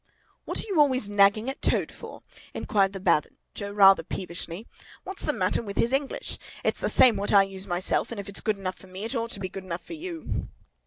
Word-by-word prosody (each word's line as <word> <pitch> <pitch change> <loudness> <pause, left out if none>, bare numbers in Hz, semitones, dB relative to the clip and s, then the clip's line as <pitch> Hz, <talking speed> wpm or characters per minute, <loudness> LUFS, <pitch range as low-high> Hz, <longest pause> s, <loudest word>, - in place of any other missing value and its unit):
"What - - 0
are - - -11
you 385 -6 0
always 260 -7 +3
nagging 205 +2 +4
at 270 - -4
Toad - - +1
for?" - - -10 0.3
inquired 195 -2 +1
the 195 - -5
Badger, 190 +3 -1
rather 195 -1 +7
peevishly. 175 +2 -6 0.4
"What's 385 0 -4
the - - +2
matter - - 0
with 200 -3 -7
his 235 +3 +2
English? 275 0 -2 0.2
It's - - +1
the - - 0
same 240 -5 +6
what 200 +1 -1
I 200 -1 +7
use 195 0 -7
myself, 175 +2 0
and 235 - -6
if 200 - -6
it's 200 - -1
good 215 -2 0
enough 185 -1 -5
for 190 - -15
me, 185 +2 -8
it 225 - -3
ought 230 -2 -2
to 200 - -3
be 190 - -3
good 190 +1 -8
enough 175 -2 -5
for - - -8
you!" 335 0 -5
200 Hz, 225 wpm, -26 LUFS, 190-235 Hz, 0.4 s, rather